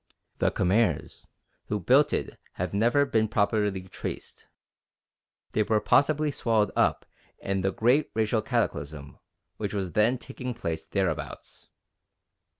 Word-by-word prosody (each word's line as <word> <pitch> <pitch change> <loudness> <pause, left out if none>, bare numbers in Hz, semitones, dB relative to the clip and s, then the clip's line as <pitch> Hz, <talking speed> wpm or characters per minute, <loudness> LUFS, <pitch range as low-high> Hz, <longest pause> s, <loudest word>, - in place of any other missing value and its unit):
The - - +3
Khmers 105 +5 0 0.4
who 105 - -1
built 135 - +4
it - - -3
have - - -4
never 120 +8 +3
been 110 -5 +1
properly 105 -2 0
traced. 95 - -7 1.0
They 110 - +1
were 110 0 +2
possibly 150 +5 +3
swallowed 110 -6 +1
up - - +2 0.3
in 95 0 -2
the 95 +1 +1
great 125 +9 +2
racial 110 0 +1
cataclysm 75 -6 -3 0.4
which 105 -1 -3
was 95 -3 -2
then 110 +6 +3
taking 125 0 -6
place 85 -9 -4
thereabouts. - - -4
110 Hz, 125 wpm, -27 LUFS, 100-120 Hz, 1.0 s, built